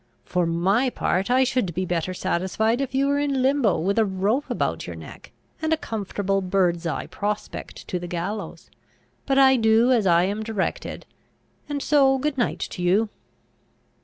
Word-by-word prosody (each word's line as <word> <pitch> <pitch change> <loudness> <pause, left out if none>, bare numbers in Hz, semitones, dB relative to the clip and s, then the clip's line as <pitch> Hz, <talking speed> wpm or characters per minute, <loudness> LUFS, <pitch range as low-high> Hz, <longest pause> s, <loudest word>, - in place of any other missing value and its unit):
For 180 -2 0
my 195 +10 +2
part, 195 -4 -1
I 255 +1 +4
should 250 -10 -1
be 185 +1 -1
better 175 0 -1
satisfied 200 +7 0
if 265 -1 -3
you 270 +1 +3
were 285 +1 +1
in 280 -3 0
limbo, 265 -7 +3
with 200 +6 0
a - - +5
rope 205 +8 -1
about - - -2
your - - -6
neck, - - -12 0.3
and 315 0 -1
a 320 - +3
comfortable 200 -5 -2
bird's 180 -2 +1
eye 165 - -3
prospect 210 +1 -5
to 180 - -2
the 175 - -6
gallows: 180 +5 -5 0.6
but 270 -1 +2
I 265 -1 +6
do 225 +2 +4
as 225 -6 +3
I 170 0 +5
am 200 +3 -1
directed; 215 -3 -3 0.6
and 285 -2 -3
so 270 -2 +4
good 290 +2 -1
night 240 - 0
to 180 - -6
you!" 195 +5 +2
215 Hz, 175 wpm, -24 LUFS, 185-265 Hz, 0.6 s, I